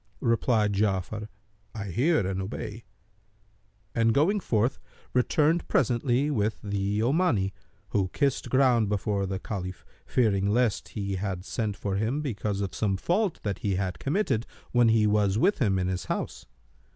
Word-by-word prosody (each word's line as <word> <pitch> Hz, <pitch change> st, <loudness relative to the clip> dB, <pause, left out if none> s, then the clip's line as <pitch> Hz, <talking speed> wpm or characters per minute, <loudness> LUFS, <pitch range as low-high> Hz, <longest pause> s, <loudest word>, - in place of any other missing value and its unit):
Replied 115 Hz, -3 st, +2 dB
Ja'afar, 100 Hz, +1 st, -1 dB, 0.5 s
"I 100 Hz, -3 st, -4 dB
hear 140 Hz, -, +2 dB
and 95 Hz, 0 st, -2 dB
obey," 105 Hz, +3 st, -6 dB, 1.1 s
and 115 Hz, -1 st, +2 dB
going 190 Hz, +9 st, +3 dB
forth, 120 Hz, -, 0 dB, 0.3 s
returned 150 Hz, +6 st, +2 dB
presently 130 Hz, +3 st, +2 dB
with 110 Hz, -5 st, 0 dB
the 100 Hz, 0 st, -1 dB
Omani, 120 Hz, -, +2 dB, 0.4 s
who 95 Hz, -2 st, +1 dB
kissed 140 Hz, +3 st, 0 dB
ground 125 Hz, -5 st, +3 dB
before 100 Hz, -1 st, 0 dB
the 95 Hz, 0 st, -2 dB
Caliph, 95 Hz, -3 st, -6 dB, 0.2 s
fearing 100 Hz, -5 st, +2 dB
lest 115 Hz, -1 st, +1 dB
he 100 Hz, -2 st, -2 dB
had 95 Hz, -1 st, -3 dB
sent 105 Hz, -2 st, -2 dB
for 100 Hz, -1 st, -2 dB
him 115 Hz, +8 st, 0 dB
because 105 Hz, -6 st, -2 dB
of 100 Hz, -, -3 dB
some 100 Hz, -3 st, 0 dB
fault 185 Hz, -, 0 dB
that 100 Hz, -3 st, -2 dB
he 100 Hz, -2 st, 0 dB
had 90 Hz, -4 st, -2 dB
committed 140 Hz, -, 0 dB, 0.2 s
when 120 Hz, -2 st, +4 dB
he 110 Hz, -1 st, +4 dB
was 105 Hz, -1 st, +2 dB
with 190 Hz, -, +3 dB
him 100 Hz, -8 st, +2 dB
in 90 Hz, -1 st, 0 dB
his 90 Hz, -1 st, -2 dB
house. -, -, -4 dB
105 Hz, 150 wpm, -27 LUFS, 100-125 Hz, 1.1 s, when